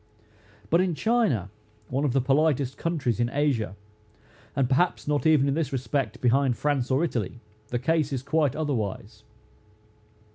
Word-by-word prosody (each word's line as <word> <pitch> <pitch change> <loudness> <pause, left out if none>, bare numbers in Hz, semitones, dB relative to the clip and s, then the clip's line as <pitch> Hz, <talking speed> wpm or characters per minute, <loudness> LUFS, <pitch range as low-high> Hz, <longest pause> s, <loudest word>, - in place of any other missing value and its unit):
But 170 - +5
in 180 -3 0
China, 160 - +1 0.4
one 135 +3 0
of 135 - 0
the 135 - +3
politest 140 0 +1
countries 145 -9 -1
in 120 0 +1
Asia, 130 -8 0 0.8
and 135 -2 +2
perhaps 145 +7 +1
not 150 +1 +1
even, 150 -3 +4
in 140 - +1
this 155 -2 -1
respect, 130 +1 -2
behind 125 0 +2
France, 145 -4 0
or 135 +4 +2
Italy, 120 - -2 0.3
the 120 - -2
case 155 +3 +1
is 135 -2 -3
quite 150 -2 +1
otherwise. 130 -11 -3
140 Hz, 150 wpm, -26 LUFS, 125-155 Hz, 0.8 s, But